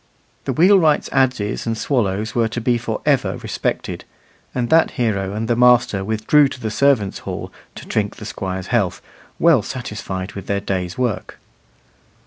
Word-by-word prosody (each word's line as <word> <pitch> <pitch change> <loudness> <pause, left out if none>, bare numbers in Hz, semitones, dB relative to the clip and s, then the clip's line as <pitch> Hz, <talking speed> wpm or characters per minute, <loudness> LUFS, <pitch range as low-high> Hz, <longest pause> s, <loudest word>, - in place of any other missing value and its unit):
The - - -1
wheelwright's 170 -3 +4
adzes 125 -6 0
and 115 -1 -1
swallows 110 -5 -1
were 115 -2 +2
to 115 +2 -4
be 120 0 +1
for - - -4
ever - - +2
respected; - - -3 0.5
and 120 -2 -1
that 165 0 +5
hero 100 -5 0
and 110 +2 -3
the 120 - +2
master 120 -5 +4
withdrew 110 +8 +3
to 135 - -8
the 110 -3 -3
servants' 120 -6 +2
hall - - -6 0.2
to - - -9
drink 105 -1 -1
the 105 - -9
Squire's 95 -3 -4
health, 105 -7 +1 0.4
well 165 -7 +5
satisfied 100 -5 -5
with 100 -2 -8
their 100 0 0
day's 95 -2 -3
work. 125 -5 -2
110 Hz, 160 wpm, -20 LUFS, 100-125 Hz, 0.5 s, that